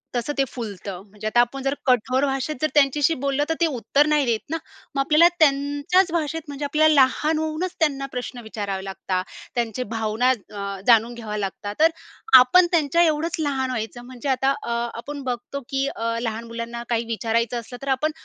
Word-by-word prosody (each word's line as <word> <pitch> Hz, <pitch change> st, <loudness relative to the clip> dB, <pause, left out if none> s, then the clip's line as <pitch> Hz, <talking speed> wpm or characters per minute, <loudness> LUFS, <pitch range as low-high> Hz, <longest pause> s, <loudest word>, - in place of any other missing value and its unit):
तसं 245 Hz, +4 st, -1 dB
ते 275 Hz, -, +4 dB
फुलतं, 200 Hz, -6 st, -7 dB
म्हणजे 210 Hz, +2 st, -7 dB
आता 240 Hz, +2 st, +2 dB
आपण 255 Hz, +3 st, -2 dB
जर 275 Hz, +1 st, +1 dB
कठोर 255 Hz, +1 st, +2 dB
भाषेत 270 Hz, +2 st, -2 dB
जर 310 Hz, -, +3 dB
त्यांच्याशी 290 Hz, +2 st, +3 dB
बोललं, 280 Hz, +1 st, +1 dB
तर -, -, +2 dB
ते -, -, +6 dB
उत्तर 280 Hz, 0 st, +1 dB
नाही 300 Hz, -2 st, +3 dB
देत 230 Hz, -3 st, +1 dB
ना. 325 Hz, -, -1 dB, 0.4 s
मग -, -, 0 dB
आपल्याला 305 Hz, +4 st, +6 dB
त्यांच्याच 290 Hz, +5 st, +3 dB
भाषेत 325 Hz, -1 st, -1 dB
म्हणजे 285 Hz, 0 st, -5 dB
आपल्याला 310 Hz, +2 st, +4 dB
लहान 300 Hz, +4 st, +2 dB
होऊनच 315 Hz, +3 st, -3 dB
त्यांना 280 Hz, -4 st, +1 dB
प्रश्न 250 Hz, 0 st, -5 dB
विचारावे 200 Hz, -3 st, -4 dB
लागता. 190 Hz, -1 st, -2 dB, 0.3 s
त्यांचे 240 Hz, 0 st, -1 dB
भावना 220 Hz, +3 st, +1 dB
अ, 200 Hz, -5 st, -3 dB
जाणून 230 Hz, 0 st, +5 dB
घ्यावे 215 Hz, -3 st, -5 dB
लागतात, 205 Hz, +1 st, -4 dB
तर 320 Hz, +1 st, +6 dB, 0.5 s
आपण 255 Hz, +9 st, +6 dB
त्यांच्या 335 Hz, -1 st, +3 dB
एवढंच 320 Hz, +1 st, +1 dB
लहान 275 Hz, -4 st, -1 dB
व्हायचं 240 Hz, 0 st, -5 dB
म्हणजे 255 Hz, +2 st, -6 dB
आता 270 Hz, +1 st, +2 dB
अ, -, -, -5 dB, 0.2 s
आपण 285 Hz, +4 st, -7 dB
बघतो 250 Hz, +2 st, -4 dB
की 270 Hz, 0 st, 0 dB
अ, 230 Hz, 0 st, -2 dB
लहान 225 Hz, -1 st, -3 dB
मुलांना 230 Hz, +1 st, -5 dB
काही 235 Hz, -1 st, 0 dB
विचारायचं 230 Hz, +1 st, -1 dB
असलं, 240 Hz, +2 st, -9 dB
तर 275 Hz, -, -8 dB
आपण 310 Hz, +4 st, 0 dB
260 Hz, 185 wpm, -23 LUFS, 230-295 Hz, 0.5 s, ते